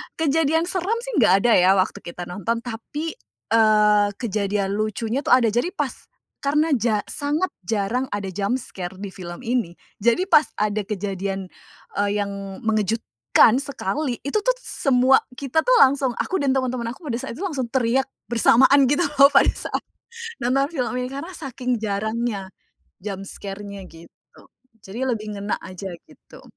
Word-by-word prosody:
kejadian 320 +1 +2
seram 385 +4 0
sih - - -4
gak 195 -3 +5
ada 240 - +4
ya 190 +2 +5
waktu 185 0 0
kita 175 +1 -8
nonton, 205 +7 -3
tapi, 275 +7 -5 0.4
eee, 210 -2 +5
kejadian 200 -2 -1
lucunya 220 +4 -1
tuh 285 - +2
ada, 235 -3 +3
jadi 290 - 0
pas - - -1 0.5
karena 300 +3 +1
ja 225 -5 +1
sangat 300 +6 -1 0.2
jarang 225 +5 0
ada 195 -2 -3
jump 200 +6 -1
scare 185 -7 -7
di 200 - -5
film 175 0 -9
ini 235 -8 -1 0.2
jadi 235 - +2
pas 305 - +6
ada 210 -1 -1
kejadian, 195 -2 -3 0.5
eee, 205 0 +2
yang 200 - -5 0.3
mengejutkan 215 - +2
sekali, 275 0 -3
itu 285 +9 +1
tuh - - +2
semua 260 0 +4 0.2
kita 280 +4 0
tuh - - +5
langsung 265 -2 +4
aku 380 - -1
dan 275 -2 +2
teman-temanku 255 +1 -2
pada 250 -7 -2
saat 270 -3 -6
itu 375 - -6
langsung 280 -10 -2
teriak 255 +1 +1 0.2
bersamaan 260 +4 +5
gitu 290 +6 +2 0.2
loh 280 0 +8
pada 275 - +6
saat - - -3 0.6
nonton 270 +3 +2
film 245 -5 -1
ini, 250 - -2
karena 285 +7 -6
saking 255 -5 -3
jarangnya 215 -1 -2 0.5
jump 195 -2 -5
scare-nya 200 0 -7
gitu, 165 +1 -18 0.4
jadi 220 +7 -7
lebih 215 -2 -4
ngena 205 +1 -2
aja 185 +1 -7 0.2
gitu. - - -17
230 Hz, 155 wpm, -23 LUFS, 200-275 Hz, 0.6 s, loh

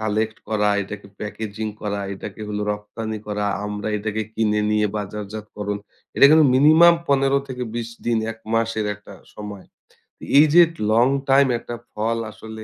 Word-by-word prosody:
Collect 110 +1 -1
করা, 105 -1 +1
এইটাকে 100 0 -7
packaging 110 0 -5
করা, 100 -1 -3
এটাকে 105 - -9
হল 105 0 -3
রপ্তানি 110 +1 -6
করা। 105 0 -2 0.2
আমরা 105 +1 -4
এটাকে 110 +1 -2
কিনে 105 -1 +1
নিয়ে 105 0 +2
বাজারজাতকরণ। 105 0 -5 0.4
এটা - - +6
কিন্তু 155 -2 +6
মিনিমাম 155 +5 +7
১৫-২০ 135 -4 0 0.2
দিন, 115 -1 +1
১ 115 - -17 0.2
মাসের 115 -2 0
একটা 105 -1 -14 0.2
সময়। 105 -2 -8 0.5
তো - - -16 0.2
এইযে 155 +3 +7 0.3
লং 120 +3 +5 0.2
টাইম 135 0 +5
একটা 120 - -7 0.2
ফল 115 +2 -1
আসলে 110 0 -10
110 Hz, 145 wpm, -22 LUFS, 105-120 Hz, 0.5 s, মিনিমাম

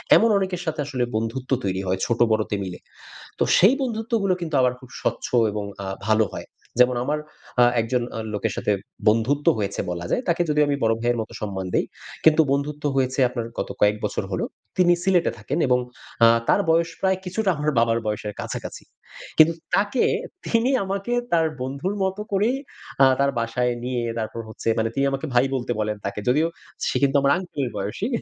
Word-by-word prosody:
এমন 230 - +5
অনেকের 185 -2 -2
সাথে 160 -1 -3
আসলে 135 -4 -2
বন্ধুত্ব 115 +4 -3
তৈরি 95 -1 -1
হয় 95 +1 0
ছোট 120 -1 -1
বড়তে 110 -1 +1
মিলে। 90 -2 -6 0.6
তো - - +4
সেই 195 +8 +6
বন্ধুত্বগুলো 225 -5 0
কিন্তু 160 -3 -3
আবার 125 -1 +3
খুব 130 - -14
স্বচ্ছ - - -1 0.3
এবং 105 0 -3 0.2
আ - - -5 0.2
ভালো 110 0 +4
হয়। - - -7 0.3
যেমন 125 0 +5
আমার 150 +3 -1 0.4
আ - - +8 0.2
একজন 120 +2 0
আ - - -3
লোকের 105 - -1
সাথে - - 0 0.4
বন্ধুত্ব 115 +7 +2
হয়েছে 100 -2 -2
বলা 85 0 -4
যায়। - - +1
তাকে 170 0 +2
যদিও 150 0 +3
আমি 145 - +1
বড় 115 0 +4
ভাইয়ের 120 0 +1
মতো 110 - -8
সম্মান 95 -3 -3
দেই। - - +2 0.4
কিন্তু 160 0 +7
বন্ধুত্ব 145 +1 -1
হয়েছে 130 0 0
আপনার 120 -2 -4
গত - - -2
কয়েক 105 0 +5
বছর - - -2
হলো। - - -1 0.3
তিনি 175 -1 +5
সিলেটে 185 -2 +3
থাকেন 130 +8 -3
এবং 125 0 +3 0.5
আ - - +9 0.2
তার - - +4
বয়স 165 +1 +3
প্রায় 190 -1 +2
কিছুটা 190 +3 -1
আমার 150 +1 0
বাবার 115 0 +2
বয়সের 105 0 -3
কাছাকাছি। - - -6 0.5
কিন্তু 160 +1 +7 0.2
তাকে 205 +5 +2 0.4
তিনি 230 +2 +2
আমাকে 195 +4 -2 0.2
তার 165 -1 +4 0.2
বন্ধুর 140 +9 -2
মত 190 0 -1
করেই 210 +7 +2 0.5
আ - - +9
তার 140 0 +3
বাসায় 120 +2 0
নিয়ে 125 -1 -1 0.2
তারপর 110 +1 -4
হচ্ছে 110 - -8
মানে 115 0 +1
তিনি 140 - +2
আমাকে 135 +3 -3
ভাই 125 +1 +4
বলতে 120 -2 -2
বলেন 105 0 -1
তাকে। 100 +1 -3
যদিও 150 +6 +3 0.4
সে - - 0
কিন্তু 140 0 +3
আমার 140 0 +3
আংকেলের 150 -8 -3
বয়সী। 100 - -3
135 Hz, 185 wpm, -23 LUFS, 115-175 Hz, 0.6 s, আ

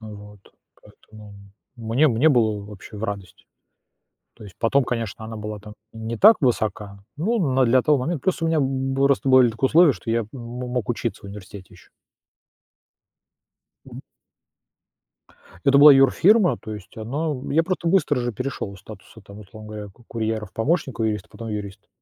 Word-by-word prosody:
А, 110 - -11
вот. 105 -1 -12 0.4
Поэтому, 105 -1 -16
м, 100 -1 -16 0.3
мне 125 +8 +3
мне 125 +5 +3
было 110 -6 +1
вообще 105 +1 -12
в 105 - -5
радость. 100 -4 -7 0.9
То - - -14
есть 100 -3 -13
потом, 135 +4 +2
конечно, 115 -3 -4
она 110 0 -8
была 105 0 -6
там 105 +1 -12 0.2
и 115 - -12
не 115 +1 -5
так 220 - +7
высока, 105 -5 -1 0.2
ну, 220 +9 0
на 130 0 +3
для 125 +2 +3
того 150 0 +2
момента 150 +3 -3
просто 180 -3 0
у - - +1
меня, 165 0 +1
м, 135 -1 -1
был 135 +1 +1
просто 140 -1 +1
были 130 -2 +6
такие 115 +4 -2
условия, 165 +2 +5
что 105 +1 -9
я 115 -1 0
мо 125 0 -7
мог 125 -3 -3
учиться 120 -1 -3
в - - -12
университете 100 -1 -11
ещё. - - -19 2.0
Мгм. - - -10 1.7
Это 140 0 +5
была 145 +1 +10
юрфирма, 175 - +4
то 110 - -8
есть 100 -4 -12
она 140 +9 -3 0.2
я 165 - +3
просто 170 -1 -2
быстро 175 -5 +2
же 120 0 -3
перешёл 125 -3 -5
из 95 - -15
статуса 110 +2 -14
там, 100 +1 -13
условно 105 +1 -13
говоря, 105 -1 -7
ку 120 +5 -21
курьера 110 -1 -3
в 95 - -21
помощника 135 -2 -1
юрист, 105 -1 -2
потом 115 +2 -9
юрист. 105 -2 -7
115 Hz, 185 wpm, -22 LUFS, 105-135 Hz, 2.0 s, была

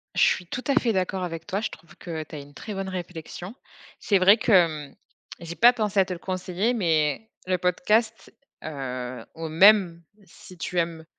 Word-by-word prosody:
Je - - +1
suis 180 - +2
tout 255 - -5
à 280 - +2
fait 240 -5 +2
d'accord 185 0 -1
avec 165 -2 -5
toi, 200 0 -2
je 220 - -2
trouve 160 0 -15
que 160 -3 -5
tu 155 - -11
as - - -6
une 145 0 -13
très 210 - -7
bonne 195 -1 -4
réflexion. 180 +1 -7 0.5
C'est 200 - +2
vrai 195 +4 +7
que, 230 - -1
hem, 155 -7 +3 0.4
j'ai 170 0 -7
pas 240 +5 +6
pensé 210 -4 0
à 190 - +5
te 185 - -4
le 175 - -8
conseiller, 185 +5 -2
mais 165 - 0 0.2
le 185 0 +1
podcast, 215 +5 0 0.3
heu, 130 -5 -5
ou 165 0 -5
même 175 0 +5 0.2
si 185 0 -15
tu 175 +3 -2
aimes 165 -1 -3
180 Hz, 200 wpm, -25 LUFS, 160-200 Hz, 0.5 s, vrai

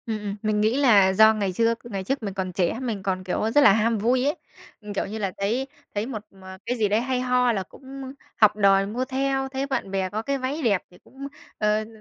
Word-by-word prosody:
Ừm, 220 -1 -2
ừm, 205 -1 -4
mình 215 -1 0
nghĩ 220 +4 +2
là 205 -9 +5
do 220 +3 +6
ngày 205 -3 -1
trước 230 +3 +1
ngày 200 -5 -5
trước 270 +5 -2
mình 200 -2 -3
còn 190 -1 -3
trẻ, 180 +5 0
mình 225 -7 -3
còn, 185 -1 -2
kiểu, 200 +4 -1
rất 290 - +5
là 275 - +8
ham 225 +1 +1
vui 250 +5 +1
ấy. 290 - +1 0.5
Ừm, 210 -1 -7
kiểu 200 - -1
như 215 +3 -6
là, 200 -3 -2
thấy 230 +7 -1 0.3
thấy 205 +1 -1
một 230 -4 -5
mà 190 -1 -12
cái 245 +2 -2
gì 215 -2 +2
đấy 210 +3 +1
hay 255 0 -1
ho 250 -1 +2
là 195 -4 -1
cũng 190 - -18 0.5
học 210 -2 +5
đòi 195 -2 +4
mua 235 +6 -3
theo, 270 0 -1
thấy 265 +1 -3
bạn 260 -8 -3
bè 190 -1 -1
có 215 +3 -3
cái 275 +4 -2
váy 270 +4 -3
đẹp 205 -8 +2
thì 180 - -17
cũng, 275 +1 -9 0.3
ờ, 210 0 +1
đ - - -12
220 Hz, 255 wpm, -24 LUFS, 200-250 Hz, 0.5 s, là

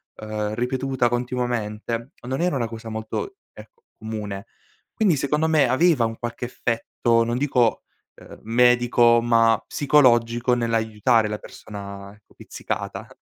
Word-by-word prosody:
ehm, 105 -1 -4
ripetuta 130 +1 0
continuamente, 120 -1 -3 0.2
non 135 +4 -2
era 175 -4 +1
una 115 -3 -1
cosa 115 0 -8
molto, 110 - -5 0.2
ehm, - - -11 0.3
comune. 105 -2 -6 0.5
Quindi 200 -8 +2
secondo 150 +3 0
me 155 -5 +3
aveva 145 -1 +3
un 115 0 -4
qualche 120 0 -5
effetto, 115 -1 0
non 120 +1 -1
dico, 125 -4 +1 0.3
ehm, - - -14
medico, 120 0 +4
ma 115 -1 +3
psicologico, 125 -4 +3
nell'aiutare 115 -1 +1
la 105 - -3
persona 100 -1 -10 0.2
pizzicata. - - -6
120 Hz, 120 wpm, -23 LUFS, 110-125 Hz, 0.5 s, medico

